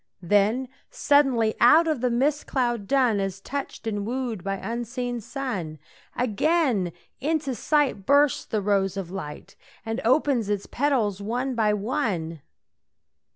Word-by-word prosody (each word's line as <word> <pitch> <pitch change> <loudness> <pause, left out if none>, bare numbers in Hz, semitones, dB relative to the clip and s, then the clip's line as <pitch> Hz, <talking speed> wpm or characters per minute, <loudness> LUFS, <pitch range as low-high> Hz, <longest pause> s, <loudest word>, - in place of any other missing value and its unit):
Then 205 +8 +2 0.2
suddenly 260 -7 +3
out 310 +8 +6
of 305 -6 0
the 250 - +2
mist 275 +5 0
cloud 240 -6 -1
dun, 255 -6 +3
As 195 -1 -3
touched 275 +2 -6
and 205 -2 -2
wooed 235 -4 -3
by 195 0 -2
unseen 240 +3 -4
sun, 230 - -4 0.4
Again 250 - +1 0.3
into 295 -1 -1
sight 280 -2 +1
bursts 285 -1 +4
the 215 -2 -2
rose 195 -1 +1
of 185 -3 -5
light 150 -6 -7 0.3
And 225 +1 -3
opens 255 -3 +2
its 205 -1 -1
petals 240 -8 0
one 245 +6 -2
by 215 -3 +2
one. 200 - -2
235 Hz, 135 wpm, -25 LUFS, 200-270 Hz, 0.4 s, out